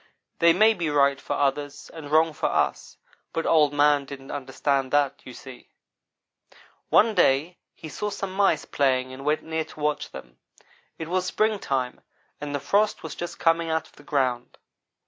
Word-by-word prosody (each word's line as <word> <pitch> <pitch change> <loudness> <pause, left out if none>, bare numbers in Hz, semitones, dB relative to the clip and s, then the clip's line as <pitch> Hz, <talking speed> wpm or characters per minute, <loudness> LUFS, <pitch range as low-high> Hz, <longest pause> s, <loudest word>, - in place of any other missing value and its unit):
They 170 0 +6
may 215 +6 +5
be 170 -6 -2
right 140 -1 +2
for - - -3
others, 145 0 -2
and 160 -3 -9
wrong 160 +1 +3
for - - -1
us, - - -1 0.4
but 165 - -2
Old 150 -3 +4
man 145 0 +3
didn't 135 -1 -9
understand 135 0 -1
that, 145 -2 +1
you 130 - -9
see. 130 -2 -12 1.2
"One 220 +1 +5
day 150 +2 +2 0.2
he 160 - -10
saw 210 +7 -4
some 195 -2 -5
mice 195 -5 +2
playing 130 -2 0
and 135 +1 -9
went 150 +2 0
near 160 0 -2
to 155 - -15
watch 150 0 -1
them. 65 - -12 0.6
It 160 - -6
was 185 +1 -1
springtime, 185 - -1 0.4
and 145 -1 -4
the - - -1
frost 205 +9 +1
was 160 - -6
just 175 0 -6
coming 165 0 +2
out 160 0 -1
of - - -21
the - - -16
ground. 130 -5 -1
150 Hz, 175 wpm, -25 LUFS, 140-165 Hz, 1.2 s, They